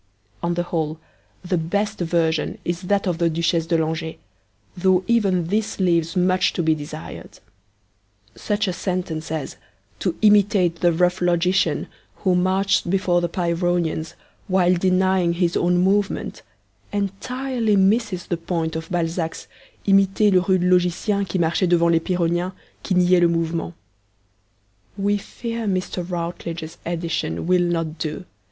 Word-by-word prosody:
On 170 0 -1
the 175 - 0
whole, 160 -2 -3 0.5
the 180 -1 0
best 205 +6 -2
version 165 -2 0
is 175 0 -2
that 200 +2 0
of 175 -3 -1
the 170 -1 +3
Duchesse 165 0 0
de 170 -1 +2
Langeais, 160 0 -2 0.6
though 185 0 +2
even 195 -7 +2
this 210 +5 -1
leaves 170 -3 +1
much 185 0 +2
to 175 - -1
be 160 0 +3
desired. 150 - -8 1.0
Such 210 0 -1
a 185 - -1
sentence 175 -4 -3
as 155 -4 -4 0.4
'to 180 -4 -1
imitate 205 -4 +4
the 175 0 +3
rough 180 +2 +1
logician 180 +2 +1 0.3
who 185 -2 0
marched 185 +1 +1
before 185 -2 +2
the 175 - -1
Pyrrhonians 170 -2 -1 0.3
while 185 -1 +3
denying 185 -1 +2
his 170 0 0
own 175 0 +2
movement' 195 +2 0 0.5
entirely 225 +3 -1
misses 195 -1 +2
the 175 - -2
point 165 -1 -2
of 160 0 -5
Balzac's 165 -1 -2 0.4
'imiter 195 +1 +4
le 185 - +5
rude 185 0 +1
logicien 180 +2 +1
qui 185 - -1
marchait 170 +2 +1
devant 170 -1 +4
les 165 - +4
pyrrhoniens, 175 +1 -1 0.3
qui 190 - -1
niaient 180 0 +4
le 175 - +6
mouvement.' 165 0 -2 1.2
We 205 +1 +1
fear 230 +1 -5
Mr. 185 -1 -2
Routledge's 170 -2 -5
edition 165 - -2
will 180 +1 +3
not 165 -2 -1
do. 160 +3 -4
175 Hz, 140 wpm, -22 LUFS, 170-190 Hz, 1.2 s, le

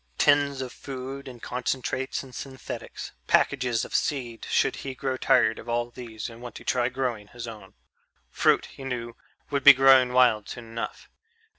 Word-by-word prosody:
Tins 145 -2 +3
of 130 -2 -6
food 135 +1 -7
and 125 -2 -9
concentrates 130 +2 -2
and 130 -2 -13
synthetics, 130 +1 -7 0.2
packages 125 -4 +2
of - - -11
seed 120 -6 -1
should - - +2
he 135 -1 -6
grow 135 -1 -2
tired 110 -3 +3
of - - -10
all 120 0 -1
these 115 -3 -7
and 115 0 -11
want 120 -2 -8
to - - -9
try 125 -1 +1
growing 120 -6 -3
his 120 +1 -8
own 105 -4 -10 0.6
fruit, - - +3
he 135 - -12
knew, 120 -3 -4 0.4
would 140 -1 0
be 145 - +12
growing 130 -1 +6
wild 120 -5 +4
soon 120 - -7
enough.... 115 0 -6
125 Hz, 170 wpm, -26 LUFS, 120-135 Hz, 0.6 s, be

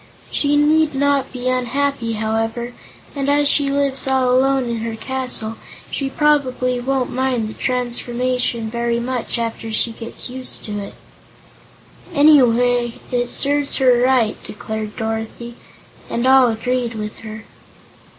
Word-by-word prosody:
She 290 0 +2
need 305 0 +3
not 280 0 +1
be 250 0 -5
unhappy, 255 -1 0
however, 225 +2 -2 0.4
and 280 0 -1
as 290 0 +3
she 285 -1 +3
lives 275 -1 0
all 260 -1 +2
alone 265 -1 +2
in 235 -1 -2
her 225 0 -4
castle 250 -2 -2 0.3
she 275 -1 -2
probably 260 -4 +1
won't 260 0 -1
mind 255 -3 0
the 215 - -7
transformation 250 -1 -1
very 235 +1 -1
much 245 0 -3
after 230 -1 -4
she 225 +2 +1
gets 230 0 -3
used 255 0 -4
to 205 -1 -4
it." 200 - -8 1.2
"Anyhow, 245 -5 +4
it 245 -1 0
serves 285 0 +1
her 250 -3 +4
right," 250 -4 +2
declared 215 0 -6
Dorothy, 225 +1 -4 0.6
and 235 +1 -1
all 260 -1 +6
agreed 240 +1 -2
with 210 -1 -5
her. 215 0 -9
250 Hz, 135 wpm, -19 LUFS, 230-270 Hz, 1.2 s, all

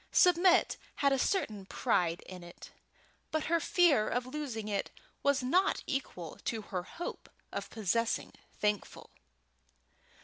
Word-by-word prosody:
Submit 360 0 +5 0.2
had 280 -1 +3
a 270 - +1
certain 215 - 0
pride 175 -9 +1
in 180 -1 -9
it, 175 - -12 0.6
but 315 -1 -1
her 335 +2 +2
fear 320 -10 +4
of 245 +1 -1
losing 255 -6 -4
it 200 -2 -1 0.3
was 280 -2 +2
not 360 +10 +2
equal 220 - -4
to 225 -2 -2
her 180 - 0
hope 340 - -7 0.2
of - - -4
possessing 225 +2 0 0.2
Thankful. 210 -2 -2
245 Hz, 130 wpm, -32 LUFS, 205-305 Hz, 0.6 s, Submit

